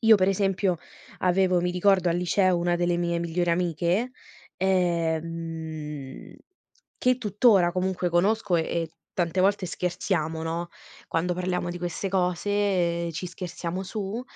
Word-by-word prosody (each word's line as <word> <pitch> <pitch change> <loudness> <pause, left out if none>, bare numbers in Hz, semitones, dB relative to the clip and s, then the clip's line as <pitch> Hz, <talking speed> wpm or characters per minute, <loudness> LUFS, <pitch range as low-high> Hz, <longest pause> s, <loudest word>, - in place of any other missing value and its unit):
Io 225 -2 +7
per 185 0 +2
esempio, 195 -2 +1 0.4
avevo 185 0 +3
mi 180 0 0
ricordo 185 0 +3
al 170 - +1
liceo 180 +1 +2
una 175 0 +1
delle 175 0 +1
mie 170 0 0
migliori 170 +1 0
amiche, 175 +7 0 0.4
ehm, 165 -5 -2 0.6
che 250 0 +2
tutt'ora 205 -5 +4
comunque 185 0 0
conosco 195 +3 +2
e 165 0 -1 0.2
tante 175 +1 0
volte 195 0 +2
scherziamo, 165 -2 -2
no, 170 +1 -3 0.4
quando 175 +2 0
parliamo 180 -1 -2
di 175 - -5
queste 175 +2 -3
cose, 180 -2 +1
ci 170 +4 -4
scherziamo 180 0 -5
su, 205 +3 -4
180 Hz, 130 wpm, -26 LUFS, 170-190 Hz, 0.6 s, Io